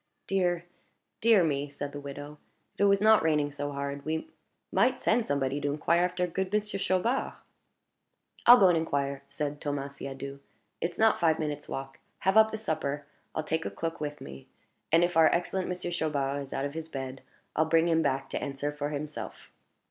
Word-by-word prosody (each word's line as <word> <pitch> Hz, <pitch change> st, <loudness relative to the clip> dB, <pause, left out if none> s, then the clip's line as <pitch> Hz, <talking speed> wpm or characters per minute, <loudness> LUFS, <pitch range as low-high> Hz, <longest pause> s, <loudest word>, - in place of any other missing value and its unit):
"Dear, 175 Hz, -3 st, 0 dB, 0.6 s
dear 220 Hz, -4 st, +6 dB
me!" 145 Hz, -2 st, 0 dB
said 145 Hz, 0 st, -5 dB
the 145 Hz, -, -6 dB
widow. 145 Hz, +1 st, -8 dB, 0.3 s
"If -, -, -28 dB
it -, -, +3 dB
was 200 Hz, 0 st, +4 dB
not 220 Hz, 0 st, +6 dB
raining 150 Hz, -2 st, +1 dB
so 145 Hz, 0 st, -4 dB
hard, 140 Hz, 0 st, -4 dB
we 160 Hz, -, -3 dB, 0.4 s
might 255 Hz, +1 st, +3 dB
send 225 Hz, 0 st, +2 dB
somebody 140 Hz, 0 st, 0 dB
to 145 Hz, 0 st, 0 dB
inquire 170 Hz, +4 st, +2 dB
after 180 Hz, 0 st, -1 dB
good 185 Hz, +2 st, -3 dB
Monsieur 210 Hz, -1 st, -1 dB
Chaubard." 195 Hz, +8 st, 0 dB, 1.1 s
"I'll 245 Hz, +1 st, +11 dB
go 195 Hz, -4 st, +6 dB
and 175 Hz, -, +4 dB
inquire," 140 Hz, -3 st, -1 dB
said 145 Hz, -1 st, -4 dB
Thomas 140 Hz, -1 st, -3 dB
Siadoux. 140 Hz, 0 st, -6 dB, 0.4 s
"It's 170 Hz, 0 st, -2 dB
not 220 Hz, -1 st, +4 dB
five 160 Hz, -2 st, +3 dB
minutes' 150 Hz, -2 st, -4 dB
walk. 135 Hz, 0 st, -6 dB, 0.2 s
Have 190 Hz, +2 st, +2 dB
up 220 Hz, 0 st, +7 dB
the 220 Hz, -, -4 dB
supper; 145 Hz, -8 st, -2 dB, 0.3 s
I'll 155 Hz, -, -1 dB
take 160 Hz, +1 st, -1 dB
a -, -, -2 dB
cloak 165 Hz, -1 st, -4 dB
with 150 Hz, 0 st, -4 dB
me; 65 Hz, 0 st, -10 dB, 0.4 s
and 165 Hz, +2 st, +5 dB
if 175 Hz, 0 st, 0 dB
our 160 Hz, -1 st, +7 dB
excellent 180 Hz, +2 st, 0 dB
Monsieur 180 Hz, -1 st, -3 dB
Chaubard 145 Hz, -4 st, -1 dB
is 135 Hz, -, -9 dB
out 135 Hz, +1 st, -1 dB
of 140 Hz, -, -4 dB
his 160 Hz, 0 st, -5 dB
bed, 135 Hz, -2 st, -5 dB, 0.3 s
I'll 160 Hz, -, +3 dB
bring 165 Hz, +1 st, +3 dB
him 165 Hz, -1 st, +3 dB
back, 135 Hz, -2 st, 0 dB
to -, -, -2 dB
answer 140 Hz, +1 st, -3 dB
for 145 Hz, 0 st, -3 dB
himself." 150 Hz, 0 st, -6 dB
155 Hz, 195 wpm, -29 LUFS, 140-180 Hz, 1.1 s, I'll